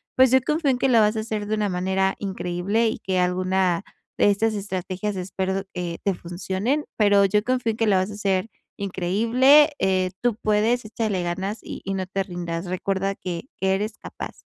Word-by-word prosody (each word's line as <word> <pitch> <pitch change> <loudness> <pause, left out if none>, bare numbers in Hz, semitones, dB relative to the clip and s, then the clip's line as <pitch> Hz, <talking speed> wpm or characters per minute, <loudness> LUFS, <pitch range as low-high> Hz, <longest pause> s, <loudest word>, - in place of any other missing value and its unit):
pues, 260 0 +6
yo 260 - +6
confío 305 -1 +1
en 250 - 0
que 270 - +1
lo 235 -3 +5
vas 210 0 +3
a - - 0
hacer 215 -2 -4
de 215 - 0
una 210 -1 0
manera 190 +1 0
increíble 195 +3 -1
y 220 - -2
que 190 -1 -2
alguna 185 0 +1 0.4
de - - +5
estas 220 +2 +1
estrategias 195 0 -3
espero, 190 +1 -2
eh, 175 -2 -4
te 200 - +1
funcionen, 190 - -2
pero 205 -2 +5
yo 210 +2 +2
confío 250 -1 0
en 220 - -7
que 225 - +1
lo 200 - +4
vas 185 +2 +1
a - - -7
hacer 195 -1 0 0.3
increíble, 230 - +4
eh, 185 -1 +1
tú 245 -3 +1
puedes, 220 +3 +1
échale 215 -4 -2
ganas 190 +5 -3
y - - -7
y 195 - -2
no 190 -1 -2
te 195 +1 -2
rindas. 175 -2 -5
Recuerda 195 +2 -1
que 175 0 -5
que 190 0 +1
eres 210 +2 -2
capaz. - - -9
195 Hz, 200 wpm, -24 LUFS, 185-220 Hz, 0.4 s, pues